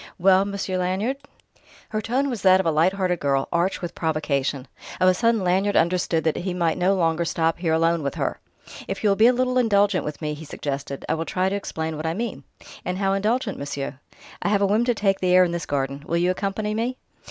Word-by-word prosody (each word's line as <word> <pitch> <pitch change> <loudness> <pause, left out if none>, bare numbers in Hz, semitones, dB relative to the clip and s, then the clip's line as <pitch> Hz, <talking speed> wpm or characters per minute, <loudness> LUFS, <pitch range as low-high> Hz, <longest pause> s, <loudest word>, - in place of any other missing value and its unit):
"Well, 190 +1 +4
Monsieur 200 -2 -3
Lanyard?" 190 +9 -1 0.7
Her 215 - -2
tone 255 +6 0
was 240 -7 -3
that 185 -1 +6
of 190 - 0
a 165 - +3
light 165 +5 +3
hearted 185 -3 -1
girl, 135 -1 0
arch 175 +2 0
with 175 0 -4
provocation. 145 -4 -1 0.3
Of 185 - +4
a 185 - +6
sudden 230 +1 +1
Lanyard 190 +3 +1
understood 170 -1 +1
that 160 - 0
he 180 0 -3
might 170 -1 0
no 185 +2 +3
longer 165 -2 +1
stop 165 0 0
here 165 -2 0
alone 165 +1 +2
with 140 -2 -3
her. - - -2 0.5
"If 195 - -4
you 210 - +4
will - - +3
be 220 +3 +6
a - - +6
little 255 0 +1
indulgent 205 -4 +3
with 150 -1 -5
me," 150 -1 -3
he 150 +2 -9
suggested, 140 -2 -5
"I - - +1
will 165 +1 -2
try 185 +2 0
to 195 - -2
explain 160 -5 -4
what 155 +1 -3
I 165 - -1
mean." 230 0 -4 0.4
"And 180 0 -3
how 195 0 +1
indulgent, 215 +2 -1
monsieur?" 140 -1 -5 0.4
"I - - 0
have 200 -1 +2
a - - +5
whim 215 +4 +2
to 245 -1 +1
take 195 -2 +1
the 180 -1 +2
air 185 - +7
in 175 - 0
this 170 -2 -4
garden. 140 0 -2
Will 170 - 0
you 175 +1 +2
accompany 200 +3 -2
me?" 235 +4 -2
185 Hz, 235 wpm, -23 LUFS, 160-200 Hz, 0.7 s, air